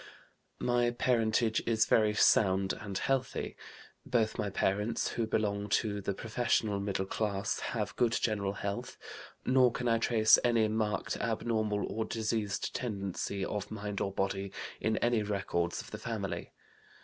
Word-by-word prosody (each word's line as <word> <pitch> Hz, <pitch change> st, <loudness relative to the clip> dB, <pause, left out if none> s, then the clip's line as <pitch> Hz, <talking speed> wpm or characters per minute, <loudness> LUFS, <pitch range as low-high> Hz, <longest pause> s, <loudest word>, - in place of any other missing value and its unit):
"My 120 Hz, -1 st, +2 dB
parentage 115 Hz, -2 st, +2 dB
is 110 Hz, -1 st, +3 dB
very 105 Hz, -1 st, +3 dB
sound 95 Hz, -2 st, +4 dB
and 100 Hz, -3 st, -5 dB
healthy. 135 Hz, -1 st, -1 dB, 0.5 s
Both 110 Hz, -3 st, +1 dB
my 105 Hz, -, 0 dB
parents 105 Hz, +3 st, 0 dB
(who 115 Hz, -2 st, -2 dB
belong 105 Hz, -2 st, -1 dB
to 105 Hz, -2 st, -2 dB
the 100 Hz, 0 st, -2 dB
professional 110 Hz, -2 st, 0 dB
middle 100 Hz, -1 st, -1 dB
class) 100 Hz, 0 st, -1 dB
have 105 Hz, -3 st, -3 dB
good 120 Hz, -2 st, +2 dB
general 100 Hz, -4 st, 0 dB
health; 100 Hz, 0 st, -4 dB, 0.5 s
nor 130 Hz, -1 st, +5 dB
can 125 Hz, +1 st, -3 dB
I 115 Hz, -1 st, +3 dB
trace 110 Hz, -1 st, +5 dB
any 115 Hz, -3 st, +3 dB
marked 105 Hz, -2 st, -1 dB
abnormal 110 Hz, -2 st, 0 dB
or 110 Hz, -, -2 dB
diseased 110 Hz, -2 st, -2 dB
tendency, 100 Hz, -3 st, -3 dB
of 105 Hz, -2 st, -4 dB
mind 105 Hz, -2 st, -4 dB
or 100 Hz, -, -1 dB
body, 95 Hz, 0 st, -2 dB, 0.3 s
in 110 Hz, 0 st, 0 dB
any 120 Hz, -2 st, +2 dB
records 95 Hz, -4 st, -1 dB
of -, -, -14 dB
the -, -, -6 dB
family. -, -, -4 dB
110 Hz, 145 wpm, -31 LUFS, 100-115 Hz, 0.5 s, nor